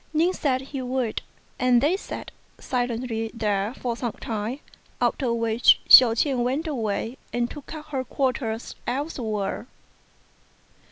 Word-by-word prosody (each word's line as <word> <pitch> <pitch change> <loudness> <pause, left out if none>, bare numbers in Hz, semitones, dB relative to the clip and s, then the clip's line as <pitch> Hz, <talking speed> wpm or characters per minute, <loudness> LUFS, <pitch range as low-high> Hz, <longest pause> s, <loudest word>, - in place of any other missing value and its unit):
Ning 340 +4 +3
said 260 -6 0
he 270 0 -6
would, 250 -3 -2 0.4
and 250 -1 +4
they 295 +8 +2
sat 390 - -7 0.3
silently 240 -3 -2
there 210 -2 0
for 240 -3 -3
some 240 -1 -3
time, 225 +4 -4 0.4
after 255 -4 +1
which 230 0 +4
Hsiao 235 -3 +9
ch'ien 255 0 +1
went 265 +7 -1
away 230 -4 -2
and 240 0 0
took 295 +2 -9
up 305 -1 -9
her 265 -3 -2
quarters 245 -3 -2
elsewhere. 240 -6 -2
245 Hz, 130 wpm, -25 LUFS, 225-270 Hz, 0.4 s, Hsiao